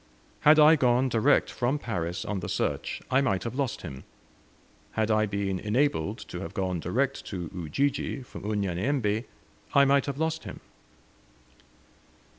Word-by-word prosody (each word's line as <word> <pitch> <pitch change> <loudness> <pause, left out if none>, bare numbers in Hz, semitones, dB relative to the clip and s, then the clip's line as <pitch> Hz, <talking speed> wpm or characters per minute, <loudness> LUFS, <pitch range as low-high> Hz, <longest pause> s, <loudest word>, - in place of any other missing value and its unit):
Had 150 +1 +6
I 155 +1 +8
gone 125 0 +3
direct 120 +5 +3
from 130 +3 0
Paris 90 - -3
on 105 -2 -2
the 90 - -5
search - - -2
I 130 +1 +4
might 100 -9 0
have 115 - -4
lost 135 -3 -2
him; 70 -7 -8 0.9
had 110 0 0
I 110 0 +3
been 100 -2 -2
enabled 110 - 0
to - - -5
have - - -7
gone 90 -2 -1
direct 130 +12 -1
to 90 -4 -5
Ujiji 130 - -1
from 125 - -10
Unyanyembe 105 +4 0 0.5
I 140 0 +7
might 140 +1 +3
have 140 -1 -3
lost 160 +1 -1
him. - - -8
115 Hz, 150 wpm, -27 LUFS, 95-140 Hz, 0.9 s, I